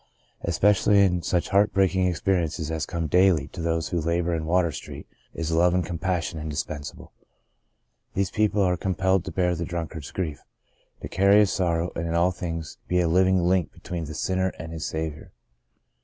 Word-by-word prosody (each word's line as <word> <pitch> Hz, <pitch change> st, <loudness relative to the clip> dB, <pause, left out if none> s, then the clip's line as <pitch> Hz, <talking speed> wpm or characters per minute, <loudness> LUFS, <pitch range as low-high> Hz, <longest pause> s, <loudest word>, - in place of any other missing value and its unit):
Especially 105 Hz, 0 st, +3 dB
in 90 Hz, -2 st, 0 dB
such 85 Hz, +2 st, -1 dB
heart 100 Hz, +2 st, +3 dB
breaking 95 Hz, -1 st, +2 dB
experiences 85 Hz, -3 st, -1 dB
as 80 Hz, -1 st, -2 dB
come 85 Hz, -1 st, -3 dB
daily 90 Hz, -2 st, +3 dB
to 85 Hz, -, -8 dB
those 80 Hz, -1 st, -1 dB
who 85 Hz, -2 st, -1 dB
labour 85 Hz, +2 st, 0 dB
in 80 Hz, -1 st, -2 dB
Water 85 Hz, -1 st, +2 dB
Street -, -, -9 dB, 0.3 s
is 85 Hz, -1 st, -3 dB
love 85 Hz, +2 st, +3 dB
and 90 Hz, -, +1 dB
compassion 85 Hz, -2 st, -2 dB
indispensable. 75 Hz, -1 st, -5 dB, 1.0 s
The 100 Hz, -, +2 dB
Greatest 95 Hz, -, -5 dB
of -, -, -31 dB
These -, -, -8 dB
19 110 Hz, -, +5 dB
These -, -, -6 dB
people 105 Hz, -, 0 dB
are 90 Hz, -1 st, +2 dB
compelled 95 Hz, 0 st, 0 dB
to -, -, -5 dB
bear 90 Hz, -1 st, +1 dB
the 85 Hz, 0 st, -3 dB
drunkard's 80 Hz, -4 st, -5 dB
grief, 80 Hz, -6 st, -4 dB, 0.6 s
to -, -, -3 dB
carry 100 Hz, +2 st, +4 dB
his 105 Hz, -, +2 dB
sorrow, 85 Hz, -2 st, 0 dB
and 85 Hz, -, -2 dB
in 85 Hz, -, -2 dB
all 85 Hz, +2 st, +3 dB
things 85 Hz, -3 st, -6 dB
be 90 Hz, -, +1 dB
a 90 Hz, -, +2 dB
living 95 Hz, +2 st, +3 dB
link 90 Hz, -1 st, +1 dB
between 85 Hz, -2 st, -6 dB
the 75 Hz, 0 st, -7 dB
sinner 95 Hz, 0 st, 0 dB
and 80 Hz, 0 st, -7 dB
his 80 Hz, -2 st, -4 dB
Saviour. 80 Hz, -1 st, -5 dB
85 Hz, 200 wpm, -25 LUFS, 80-95 Hz, 1.0 s, 19